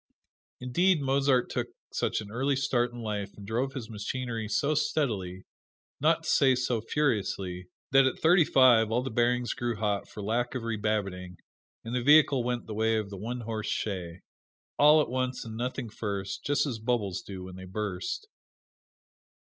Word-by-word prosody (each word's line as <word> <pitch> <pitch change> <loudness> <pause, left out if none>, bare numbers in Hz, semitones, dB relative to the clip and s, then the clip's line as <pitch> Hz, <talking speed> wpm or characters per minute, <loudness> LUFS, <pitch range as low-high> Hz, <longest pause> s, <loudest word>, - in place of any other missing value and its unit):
Indeed, 170 +8 +2
Mozart 135 -2 +2
took - - -2 0.3
such - - 0
an 105 -1 -10
early 135 +4 0
start 125 -2 +1
in 120 0 -8
life 105 -2 -4
and 100 - -10
drove 125 +6 -1
his 130 -5 -6
machinery 115 +1 -4
so 140 +7 +1
steadily, 105 - -1 0.6
not 160 +3 +2
to 160 - -4
say 135 -2 +4
so 125 -2 -1
furiously, 100 -9 -1 0.2
that 135 0 +6
at 130 - -2
thirty 175 +2 +5
five 125 -6 +5
all 120 +2 +1
the 130 - -4
bearings 120 +1 +1
grew 120 -1 -2
hot 105 -2 -1
for 105 - -8
lack 120 +5 -1
of 125 - -3
rebabbitting, 100 -5 -2 0.5
and 115 +1 -6
the 125 - 0
vehicle 145 -1 +5
went 120 0 -2
the 110 - -6
way 110 +1 +1
of 105 -2 -3
the 100 - -6
one 120 +5 -4
horse 110 -1 -4
shay 90 -4 -3 0.6
all 150 +2 +7
at - - -6
once 130 -1 -2
and 110 -1 -7
nothing 125 +1 -3
first, 100 -3 -4
just 145 0 +1
as 125 -6 -3
bubbles 110 -5 -1
do 95 -2 -8
when 90 0 -9
they 95 0 -9
burst. 100 - -4
120 Hz, 175 wpm, -28 LUFS, 105-130 Hz, 0.6 s, all